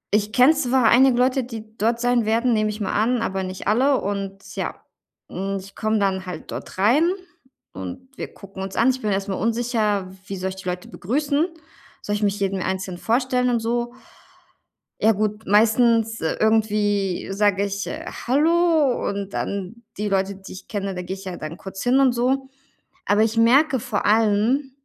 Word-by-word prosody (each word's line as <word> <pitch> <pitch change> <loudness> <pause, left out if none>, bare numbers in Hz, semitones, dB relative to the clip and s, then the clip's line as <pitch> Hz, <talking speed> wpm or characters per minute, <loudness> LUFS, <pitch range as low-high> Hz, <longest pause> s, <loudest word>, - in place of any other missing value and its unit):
Ich 210 0 +1
kenne 255 +6 +6
zwar 260 -4 +1
einige 255 0 +5
Leute, 255 +1 +2
die 220 -2 -9
dort 230 +3 +1
sein 245 -1 +2
werden, 230 +3 +2
nehme 215 -1 +1
ich 210 - -5
mal 200 - -2
an, 230 +3 +1
aber 190 -2 -2
nicht 185 +1 -6
alle. 260 +6 +3
Und 195 -1 -5
ja, - - -3 0.6
hm, 195 +1 -3
ich 195 +1 -13
komme 220 0 0
dann 190 -2 0
halt 175 -3 -7
dort - - -7
rein 260 - +4 0.6
und 95 - -8
wir - - -6
gucken 195 -1 -11
uns 190 0 -5
an. 245 +3 +4
Ich 260 - -5
bin 210 - -1
erstmal 195 0 -2
unsicher, 220 -3 0 0.2
wie 195 - -4
soll 190 +1 -2
ich 190 - -7
die 185 -1 -5
Leute 180 0 -5
begrüßen, 285 - 0 0.6
soll 205 - -1
ich 210 - -3
mich 205 0 0
jedem 195 -1 -1
einzeln 185 -1 -3
vorstellen 250 +1 +1
und 235 -1 +1
so? 240 +1 -1 1.1
Ja, 220 - +5
gut, 210 +1 -2
meistens, 225 +2 +3
äh, 160 - -1
irgendwie 210 -3 +1
sage 200 0 +2
ich, 200 0 -4
äh: - - -6 0.2
„Hallo“ 315 0 +3
und 200 -1 -5
dann 200 +4 -4
die 210 +1 -2
Leute, 195 0 0
die 190 +1 -11
ich 185 - -11
kenne, 195 -2 -3
da 180 - -3
gehe 180 +2 -5
ich 195 0 -12
ja 185 -2 -5
dann 155 +2 -7
kurz 195 +1 -7
hin 250 +2 +3
und 265 -3 +4
so. 265 +3 0 0.6
Aber 205 +1 +3
ich 225 +1 -1
merke 260 +4 +4
vor 215 -2 -2
allem, 225 +6 +2
215 Hz, 190 wpm, -22 LUFS, 195-245 Hz, 1.1 s, kenne